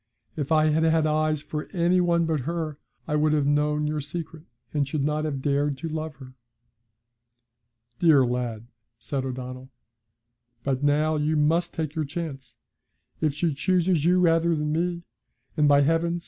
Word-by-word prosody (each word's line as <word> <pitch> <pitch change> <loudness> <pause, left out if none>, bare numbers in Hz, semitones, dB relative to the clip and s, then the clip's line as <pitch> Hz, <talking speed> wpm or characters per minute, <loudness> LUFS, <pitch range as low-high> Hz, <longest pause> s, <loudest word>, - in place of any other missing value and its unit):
If 145 -1 -4
I 155 0 +4
had 155 +1 +2
had 160 -1 +3
eyes 155 -1 +1
for 150 0 -5
any 180 0 +3
one 170 -1 +2
but 160 -2 0
her, 155 +1 -4 0.3
I 150 - 0
would 150 0 +2
have 150 -2 +2
known 150 +1 +1
your 150 0 -1
secret, 160 +2 -7 0.3
and 145 -2 0
should 140 0 -2
not 150 +1 0
have 140 -3 -3
dared 145 0 +1
to 165 +4 -5
love 155 -1 -4
her.' 130 -2 -13 1.7
'Dear 155 -6 +5
lad!' 120 -2 -3 0.3
said 135 +2 -4
O'Donnell. 130 0 -6 0.9
'But 135 -1 -1
now 150 +2 +2
you 150 +1 0
must 165 +4 +1
take 155 -2 -3
your 155 -1 -2
chance. 140 -4 -6 0.7
If 150 -3 +1
she 165 0 0
chooses 175 +1 +1
you 180 +2 +4
rather 165 -1 +3
than 150 0 -2
me 170 +2 -1 0.5
and, 150 -2 +3
by 145 0 +5
heavens! 165 +3 +1
155 Hz, 165 wpm, -25 LUFS, 145-165 Hz, 1.7 s, Dear